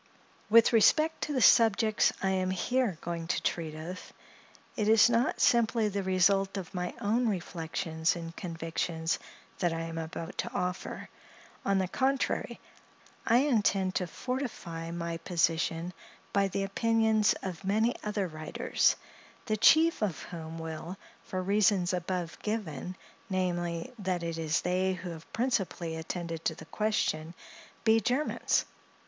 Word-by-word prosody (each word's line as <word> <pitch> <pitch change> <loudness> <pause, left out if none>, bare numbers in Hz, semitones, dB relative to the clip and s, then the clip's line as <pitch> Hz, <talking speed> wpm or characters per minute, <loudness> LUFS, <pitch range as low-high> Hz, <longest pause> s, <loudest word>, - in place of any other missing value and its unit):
With 230 +2 +6
respect 310 +8 +4
to 300 - -4
the 255 -4 +2
subjects 220 -1 +5
I 190 - +2
am 185 -1 0
here 205 +1 0
going 170 -1 -4
to - - -1
treat 160 -2 -2
of, 170 +4 -7 0.6
it 210 -4 0
is 220 +1 +6
not 235 +2 +1
simply 230 -2 +3
the 200 0 -2
result 195 +1 +2
of 185 -4 -6
my 180 -1 -3
own 230 +3 +1
reflections 165 -3 -2
and 165 -1 -7
convictions 165 -1 -2 0.4
that 175 - +1
I 165 - -3
am 165 0 -4
about 165 +1 -6
to 235 - -2
offer. 180 -5 -3 0.6
On 195 0 +2
the 190 -1 +1
contrary, 265 +7 0 0.7
I 235 +2 +5
intend 205 -8 +2
to 185 -1 -1
fortify 180 -9 -4
my 170 0 -3
position 165 0 0 0.4
by 200 -1 +3
the 195 +1 -2
opinions 220 +1 +2
of 185 -1 -5
many 220 +5 +2
other 205 -2 -1
writers; 155 -1 +1 0.5
the 215 - 0
chief 320 +9 +5
of 195 -7 -1
whom 165 -2 -7
will, 165 +3 -6 0.3
for 185 - -3
the - - -6
reasons 200 -2 +3
above 180 -1 -3
given, 185 -6 -3 0.3
namely, 175 +3 -2
that 185 -3 -1
it 165 -1 -3
is 160 +1 0
they 185 +1 +1
who 180 -1 -6
have 165 -1 -11
principally 195 -9 -1
attended 165 0 -5
to 160 - 0
the 160 - -11
question, 170 -5 -1 0.5
be 225 0 +5
Germans. 255 +6 +1
185 Hz, 145 wpm, -30 LUFS, 165-215 Hz, 0.7 s, With